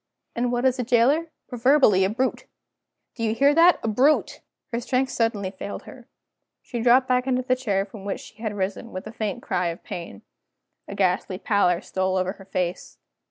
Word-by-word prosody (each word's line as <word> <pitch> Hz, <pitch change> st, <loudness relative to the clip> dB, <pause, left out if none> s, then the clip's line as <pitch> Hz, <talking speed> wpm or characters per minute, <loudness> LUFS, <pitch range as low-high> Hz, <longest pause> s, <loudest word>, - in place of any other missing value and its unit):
And 240 Hz, +1 st, 0 dB
what 245 Hz, +1 st, 0 dB
is 260 Hz, 0 st, +2 dB
a -, -, +1 dB
jailer? 255 Hz, +8 st, +3 dB, 0.2 s
Proverbially 245 Hz, -5 st, +4 dB
a 190 Hz, -, +2 dB
brute. 255 Hz, +5 st, -2 dB, 0.7 s
Do 235 Hz, -, -9 dB
you 220 Hz, 0 st, 0 dB
hear 280 Hz, +4 st, +4 dB
that? 340 Hz, +3 st, +6 dB
A -, -, -1 dB
brute!" 260 Hz, +8 st, +2 dB, 0.3 s
Her 235 Hz, -, 0 dB
strength 255 Hz, +2 st, 0 dB
suddenly 210 Hz, -5 st, -1 dB
failed 200 Hz, +1 st, -7 dB
her. -, -, -13 dB, 0.6 s
She 240 Hz, -, -5 dB
dropped 250 Hz, +2 st, +5 dB
back 250 Hz, 0 st, +1 dB
into 255 Hz, -1 st, +1 dB
the 255 Hz, 0 st, +1 dB
chair 205 Hz, -7 st, -1 dB
from 200 Hz, 0 st, -12 dB
which 200 Hz, -1 st, -3 dB
she -, -, -15 dB
had 215 Hz, -3 st, -3 dB
risen, 195 Hz, +4 st, -3 dB
with 185 Hz, -, -7 dB
a 215 Hz, -, -7 dB
faint 215 Hz, -4 st, -4 dB
cry 180 Hz, 0 st, -1 dB
of 170 Hz, 0 st, -5 dB
pain. 165 Hz, -, -8 dB, 0.6 s
A 200 Hz, -, -7 dB
ghastly 185 Hz, -1 st, 0 dB
pallor 185 Hz, -4 st, +1 dB
stole 185 Hz, 0 st, -1 dB
over 185 Hz, 0 st, 0 dB
her 195 Hz, -1 st, -13 dB
face. 180 Hz, -1 st, -3 dB
225 Hz, 195 wpm, -24 LUFS, 190-255 Hz, 0.7 s, that